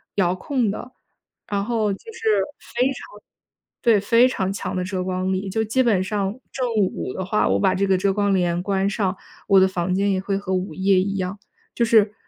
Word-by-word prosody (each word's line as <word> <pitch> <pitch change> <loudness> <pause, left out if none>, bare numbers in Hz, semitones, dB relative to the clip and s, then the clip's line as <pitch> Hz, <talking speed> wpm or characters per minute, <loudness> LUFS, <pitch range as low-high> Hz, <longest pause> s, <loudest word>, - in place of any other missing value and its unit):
遥 180 -2 +2
控 245 +3 -1
的， 230 +5 -6 0.6
然 200 -1 -1
后 220 -3 0
就 - - -8
是 470 - -11 0.6
非 245 +1 +3
常 270 - +1 0.9
对， 230 -4 +4
非 230 +5 +4
常 190 -7 -1
强 195 - -4
的 185 - -1
遮 185 0 -3
光 185 0 -2
力。 190 +1 -2
就 220 +3 0
基 225 +4 +1
本 210 -6 +2
上 200 +1 -2 0.2
正 255 -2 -2
午 190 -10 -1
的 190 - -4
话， 210 +3 +1
我 95 +1 +2
把 - - +2
这 200 - +1
个 190 - +3
遮 195 +2 +1
光 205 0 +1
帘 175 -2 +1
关 195 0 0
上， 195 -2 -1 0.3
我 195 -1 +6
的 190 - +5
房 180 -1 -2
间 200 +2 +1
也 190 - +1
会 195 +1 -2
和 195 -1 -5
午 185 -2 -2
夜 190 +2 +3
一 195 +1 -1
样， 190 +1 -3 0.4
就 235 - +2
是 220 -2 +4
195 Hz, 230 characters per minute, -22 LUFS, 185-215 Hz, 0.9 s, 我